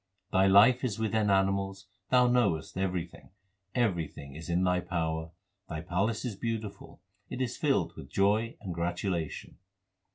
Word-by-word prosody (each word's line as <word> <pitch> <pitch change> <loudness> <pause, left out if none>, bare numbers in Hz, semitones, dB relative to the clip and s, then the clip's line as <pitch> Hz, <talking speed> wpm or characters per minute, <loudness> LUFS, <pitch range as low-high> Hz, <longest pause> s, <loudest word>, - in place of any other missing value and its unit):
Thy 95 0 +4
life 110 +7 +6
is 115 -6 -1
within 110 -1 +1
animals; 95 0 +1 0.2
Thou 125 -1 +5
knowest 120 -11 +1
everything; 90 -3 -3 0.5
Everything 85 - -1
is 80 +4 -9
in 85 +2 +2
Thy 90 -1 +2
power; 80 -3 -2 0.4
Thy 80 - -4
palace 100 +7 -1
is 115 -5 -3
beautiful; 110 -1 -5 0.3
It - - -5
is 130 -3 -1
filled - - +1
with 70 - -10
joy 105 +6 +1
and 95 -5 -5
gratulation. 85 -1 -3
95 Hz, 140 wpm, -30 LUFS, 85-110 Hz, 0.5 s, life